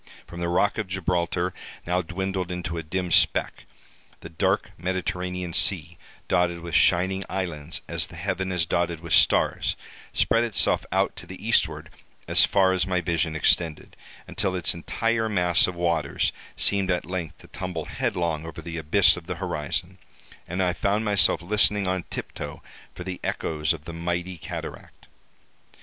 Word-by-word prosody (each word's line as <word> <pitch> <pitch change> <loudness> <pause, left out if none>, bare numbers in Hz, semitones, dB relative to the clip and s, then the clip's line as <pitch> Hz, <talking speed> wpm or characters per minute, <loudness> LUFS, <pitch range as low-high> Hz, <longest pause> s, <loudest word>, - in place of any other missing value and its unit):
From 85 - -9
the 85 0 -1
rock 100 +5 +2
of 105 - -2
Gibraltar, 90 -1 -1 0.3
now 90 +1 +1
dwindled 95 +1 -3
into 90 -1 -4
a 85 - -2
dim 90 +3 -3
speck, - - +2 0.6
the - - -8
dark 80 - 0
Mediterranean 90 0 -3
sea, 85 -3 +3 0.3
dotted 85 -1 +1
with 85 -1 -7
shining 95 +4 +3
islands 85 -5 -3
as - - 0
the - - -12
heaven 95 0 -2
is 90 -2 +1
dotted 85 -1 -1
with 85 -2 -3
stars, - - +4 0.4
spread 115 +1 +3
itself 115 -3 +2
out - - +1
to - - -9
the - - -8
eastward - - +2 0.4
as - - +5
far 95 -2 +3
as 95 -1 +1
my 90 -1 +1
vision 85 -1 0
extended, 80 0 +1 0.3
until 95 -2 0
its 90 - +2
entire 110 +6 -1
mass 90 -4 +4
of 90 - -4
waters 85 -4 0 0.3
seemed 100 -2 +2
at 90 -1 0
length 90 -3 -4
to - - -16
tumble 90 -4 -5
headlong 85 -3 -1
over 80 -1 -8
the 85 0 -5
abyss 80 +6 +4
of 90 -1 -10
the 90 - -3
horizon, 85 -5 -3 0.5
and 90 +3 -1
I 90 -1 +1
found 100 +4 0
myself 100 -4 +3
listening 105 +1 +3
on 95 -1 -1
tiptoe - - -6 0.3
for 90 - -6
the 90 0 -5
echoes 75 -1 -1
of 80 -2 -4
the 85 - -7
mighty 85 +1 -3
cataract. - - -8
90 Hz, 165 wpm, -25 LUFS, 85-95 Hz, 0.6 s, as